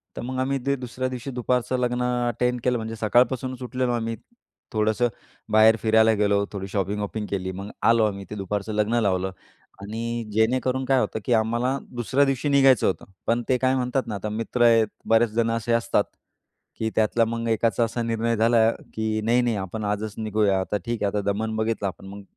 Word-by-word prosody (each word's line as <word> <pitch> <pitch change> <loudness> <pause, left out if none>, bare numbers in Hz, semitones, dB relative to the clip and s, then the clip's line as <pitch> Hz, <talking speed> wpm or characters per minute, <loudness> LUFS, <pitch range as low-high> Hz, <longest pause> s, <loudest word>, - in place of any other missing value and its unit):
तर - - -5
मग 130 +1 -4
आम्ही 135 +1 0
ते 140 - +2
दुसऱ्या 130 0 -4
दिवशी 130 +2 -6
दुपारचं 125 +1 0
लग्न 125 0 0 0.3
अटेंड 125 +1 0
केलं 125 -1 +2
म्हणजे 110 0 -5
सकाळपासूनच 125 +3 +1
उठलेलो 125 0 -1
आम्ही, 115 -1 -2 0.6
थोडंसं 110 +3 +2 0.4
बाहेर 110 +1 +6
फिरायला 110 0 +4
गेलो, 100 -1 +2
थोडी 100 -1 -5
शॉपिंग-वॉपिंग 105 +2 -2
केली. 95 -1 -2
मग 100 +2 -7 0.2
आलो 115 -1 +5
आम्ही, 100 -2 -3
ते 105 - -6
दुपारचं 100 +2 -3
लग्न 105 +3 +1
लावलं. 95 -2 0 0.5
आणि 115 +3 -4
जेणेकरून 130 +4 +1
काय 135 0 +3
होतं, 110 - -1
की 120 - +2
आम्हाला 120 +4 +1 0.2
दुसऱ्या 120 +5 +2
दिवशी 135 +1 -1
निघायचं 135 -4 +5
होतं, 95 - -2 0.2
पण 120 +1 +2
ते 130 - +4
काय 130 +1 +2
म्हणतात 125 0 -1
ना 105 - -3
आता 105 +2 -4
मित्र 115 +3 -3
आहेत 115 -2 +5 0.2
बरेच 115 0 +4
जण 115 +1 +1
असे 115 +1 -2
असतात, 115 -3 +2 0.8
की 110 0 0
त्यातला 110 +1 +3
मग 115 +1 -3
एकाचा 115 +1 +2
असा 115 +1 -2
निर्णय 115 0 0
झाला, 115 0 +4 0.2
की 110 0 -1
"नाही, 120 +3 +3
नाही. 120 -3 0
आपण 100 +3 -4
आजच 105 +1 -2
निघूया. 105 -3 +1
आता 105 +2 -2
ठीक 120 -2 -2
आहे. 100 - +3
आता - - +1
दमन 110 +2 -2
बघितलं 110 -2 -1
आपण 95 +1 -8
मग, 100 0 -9
115 Hz, 190 wpm, -24 LUFS, 105-125 Hz, 0.8 s, बाहेर